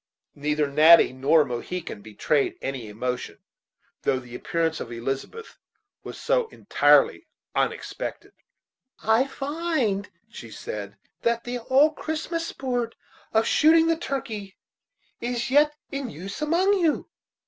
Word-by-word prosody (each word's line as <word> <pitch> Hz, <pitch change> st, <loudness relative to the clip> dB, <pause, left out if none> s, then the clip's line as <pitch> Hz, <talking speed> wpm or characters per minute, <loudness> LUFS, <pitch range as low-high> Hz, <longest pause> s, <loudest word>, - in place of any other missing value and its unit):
Neither 150 Hz, +1 st, 0 dB
Natty 155 Hz, +1 st, +7 dB
nor 140 Hz, +4 st, +4 dB
Mohegan 125 Hz, -, -5 dB
betrayed 110 Hz, +7 st, 0 dB
any 130 Hz, -5 st, -4 dB
emotion, 125 Hz, +4 st, -4 dB, 0.6 s
though 130 Hz, -, +1 dB
the 125 Hz, -2 st, -10 dB
appearance 165 Hz, +4 st, -1 dB
of 120 Hz, -, -6 dB
Elizabeth 135 Hz, -, -5 dB, 0.4 s
was -, -, -8 dB
so -, -, +1 dB
entirely -, -, +3 dB, 0.3 s
unexpected. -, -, -3 dB, 0.7 s
"I 225 Hz, +5 st, +3 dB
find," 275 Hz, -, -1 dB, 0.2 s
she 120 Hz, -, -10 dB
said, 100 Hz, -2 st, -7 dB, 0.2 s
"that 235 Hz, 0 st, +1 dB
the 245 Hz, 0 st, -4 dB
old 275 Hz, +6 st, +3 dB
Christmas 330 Hz, +1 st, -3 dB
sport 245 Hz, -3 st, -3 dB, 0.4 s
of 220 Hz, 0 st, +3 dB
shooting 320 Hz, +1 st, +5 dB
the 330 Hz, 0 st, +3 dB
turkey 225 Hz, -, -5 dB, 0.6 s
is 240 Hz, +1 st, -2 dB
yet 295 Hz, +2 st, +4 dB, 0.2 s
in 275 Hz, -2 st, -3 dB
use 195 Hz, -, -8 dB
among 365 Hz, +6 st, +2 dB
you. 325 Hz, -4 st, +1 dB
225 Hz, 120 wpm, -25 LUFS, -, 0.7 s, Natty